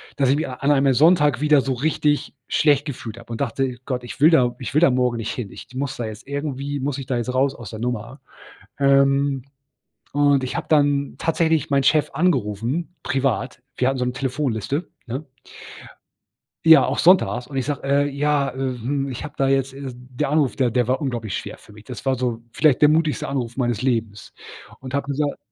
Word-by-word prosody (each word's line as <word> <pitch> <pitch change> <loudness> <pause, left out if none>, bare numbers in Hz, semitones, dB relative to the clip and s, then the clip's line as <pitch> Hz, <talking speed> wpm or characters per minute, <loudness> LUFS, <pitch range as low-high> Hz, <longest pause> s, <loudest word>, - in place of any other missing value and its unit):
dass 135 -2 +2
ich 140 - +3
mich 155 - -2
a 130 - -6
an 140 +3 0
einem 135 -1 +3
Sonntag 150 0 +4
wieder 150 -1 +5
so 135 0 -1
richtig 145 +2 0
schlecht 145 -2 +2
gefühlt 120 -6 -6
habe 115 0 -13
und 115 - -5
dachte: 135 0 -1
„Gott, 125 -2 -3
ich 120 - -9
will 155 - +8
da 125 -7 +3
ich 130 - -6
will 150 - +4
da 175 - +6
morgen 125 -2 +1
nicht 115 -2 -3
hin. 115 -6 -6
Ich - - -11
muss 135 0 -3
da 120 - -3
jetzt 110 0 -8
irgendwie 140 0 -4
muss 135 0 -2
ich 135 - -6
da 125 0 -1
jetzt 120 +1 -3
raus 135 +1 +2
aus 120 -6 -10
der 110 - -7
Nummer.“ 120 +2 -4 0.6
Ähm, 140 -1 +3 0.7
und 145 -2 +3
ich 130 - -4
habe - - -4
dann 145 -2 +2
tatsächlich 160 -2 +1
meinen 140 -1 +3
Chef 150 +2 +3
angerufen, 140 - -1
privat. 130 -2 -1
Wir 130 - +2
hatten 135 0 -1
so 125 - 0
'ne 125 - -1
Telefonliste, 135 - -2 0.2
ne? 130 +6 -5 1.4
Ja, 160 0 +8
auch - - -2
sonntags. 170 -9 +4
Und 135 -2 -5
ich 130 - -2
sage: 145 -3 -3
„Äh, 140 +1 +2
ja, 145 0 0
äh, 125 - -7
hm,“ 135 +1 -2
ich 130 - -6
hab 150 0 -8
da 135 - +1
jetzt, 135 0 +1
äh 140 - -9
der 125 +3 -4
Anruf, 150 -4 +1
der 125 -3 +2
der 120 0 0
war 130 +1 +2
unglaublich 120 -7 -3
schwer - - -7
für 105 - -17
mich. 105 0 -15
Das 120 0 -9
war 135 - +3
so 120 -2 -2
vielleicht 150 -5 +3
der 150 - +7
mutigste 155 0 +1
Anruf 125 -3 -3
meines 120 -4 0
Lebens. 115 -5 -2 0.5
Und 130 +1 -8
habe 140 0 -1
gesagt 145 +1 -1
135 Hz, 210 wpm, -22 LUFS, 125-145 Hz, 1.4 s, will